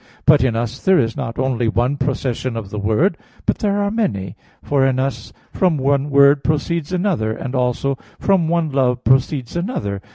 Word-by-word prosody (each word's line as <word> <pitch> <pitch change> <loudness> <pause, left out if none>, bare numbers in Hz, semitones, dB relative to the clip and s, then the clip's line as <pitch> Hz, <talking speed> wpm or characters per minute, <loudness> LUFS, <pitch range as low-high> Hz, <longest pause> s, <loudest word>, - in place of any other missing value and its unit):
But - - +6
in 125 -4 +1
us 120 +2 -3
there 190 -1 +4
is 115 -7 +1
not 115 - -5
only 125 -3 0
one 120 +5 +1
procession 130 -3 -2
of 100 -4 -6
the 105 - -4
word, 110 - +1 0.3
but - - 0
there 205 -1 0
are 200 - -1
many: 100 - -2 0.3
for 140 -2 +1
in 135 -1 +2
us 130 -4 -3 0.2
from 180 -5 +2
one 140 +1 +1
word 140 0 +5
proceeds 155 +1 -1
another; 175 - 0
and 125 +3 -6
also 130 +1 -1 0.2
from 190 -5 +2
one 165 -2 0
love 125 -2 +1
proceeds 130 0 +1
another. 115 - -3
135 Hz, 185 wpm, -19 LUFS, 120-160 Hz, 0.3 s, But